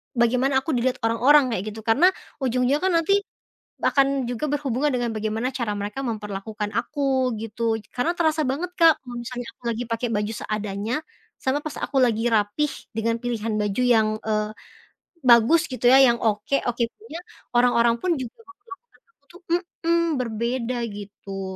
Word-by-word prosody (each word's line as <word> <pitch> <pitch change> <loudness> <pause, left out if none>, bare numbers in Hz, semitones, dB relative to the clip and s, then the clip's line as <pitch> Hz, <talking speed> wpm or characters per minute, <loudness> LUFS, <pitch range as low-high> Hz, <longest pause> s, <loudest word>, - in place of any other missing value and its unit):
bagaimana 250 +3 +2
aku 320 - -2
dilihat 250 0 +1
orang-orang, 255 +4 +4
kayak 195 -4 -2
gitu. 220 - -9
Karena 260 +11 +4 0.3
ujung-ujungnya 255 +2 +1
kan 375 0 +1
nanti, 395 +5 +3 0.6
akan 275 -1 +2
juga 245 +5 -2
berhubungan 285 -1 0
dengan 240 -2 0
bagaimana 220 +3 -2
cara 235 -5 -2
mereka 205 +5 -4
memperlakukan 210 -1 -4
aku, 260 -2 0
gitu. 225 +1 -1 0.2
Karena 290 +8 0
terasa 315 -2 +1
banget, 310 +8 -2
Kak. 330 -2 +7
Kalo 245 -2 -9
misalnya 245 0 -6
aku - - -44
lagi 235 +1 -2
pakai 230 +1 -1
baju 210 +1 -1
seadanya, 210 +2 -3 0.5
sama 265 +2 +1
pas 310 - -5
aku 275 - -1
lagi 230 -3 +2
rapi, 210 +7 +2 0.3
dengan 230 +1 0
pilihan 230 -3 -2
baju 210 +4 0
yang, 225 -3 +4 0.2
eee, 215 -1 0 0.8
bagus, 235 +8 +6
gitu, 250 -1 -4
ya? 265 - +8
Yang 240 -2 +4
oke 210 +6 0
oke 240 0 0 0.2
punya, 340 -7 -8 0.4
orang-orang 235 -1 +4
pun 365 - 0
juga 250 -2 -6
memperlakukan 405 +4 -16 0.2
aku 285 - -47
tuh 355 - -15 0.2
mhm. 340 -1 -1 0.2
Berbeda, 235 +1 -2 0.2
gitu. 200 -1 -8
245 Hz, 160 wpm, -24 LUFS, 220-275 Hz, 0.8 s, ya